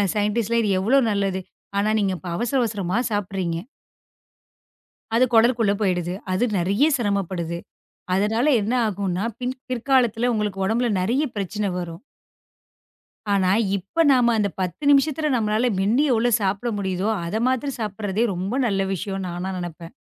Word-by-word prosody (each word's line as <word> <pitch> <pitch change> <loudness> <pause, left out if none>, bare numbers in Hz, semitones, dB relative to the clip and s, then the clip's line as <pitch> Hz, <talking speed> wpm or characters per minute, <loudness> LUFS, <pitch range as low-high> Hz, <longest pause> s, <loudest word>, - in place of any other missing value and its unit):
ஸைன்டிஸ்ட்லாம் 220 +2 +1
இது 210 - +1
எவ்வளவு 240 +6 +3
நல்லது, 195 -2 0 0.4
ஆனா 205 +2 +2
நீங்க 195 -2 +1 0.2
அவசர 240 +7 0
அவசரமா 200 -4 -2
சாப்பிடுறீங்க. 190 -4 -2 1.6
அது 250 +2 +5
குடலுக்குள்ள 230 -2 +4
போயிடுது. 180 -3 0 0.2
அது 185 +6 +1
நெறைய 200 - +2
சிரமப்படுது. 190 -6 -2 0.6
அதனால 215 +6 +1 0.2
என்ன 220 - -1
ஆகும்னா 195 -1 -2 0.2
பின் 250 +1 -3
பிற்காலத்துல 245 -2 +2
உங்களுக்கு 210 -3 -2
உடம்புல 235 +3 +1
நிறைய 235 +10 +1
பிரச்சன 205 +2 -2
வரும். 170 0 -6 1.3
ஆனா 190 -2 +2 0.3
இப்ப 200 - 0
நாம 245 -2 +4
அந்தப் 200 -3 -1
10 185 - -4
நிமிஷத்துல 295 +1 +2
நம்மளால 220 +1 +1
மென்னு 220 +9 +2
எவ்ளோ 235 +1 +2
சாப்பிட 200 +4 -1
முடியுதோ 190 +1 -1 0.2
அத 170 +5 -4
மாத்திரம் 260 +1 -1
சாப்பிடுறதே 210 +1 -2
ரொம்ப 190 +7 -3
நல்ல 195 -4 +1
விஷயம்னு 195 +1 -4
நானா 175 +2 -4
நனப்பேன். 170 -1 -7
205 Hz, 130 wpm, -23 LUFS, 190-235 Hz, 1.6 s, அது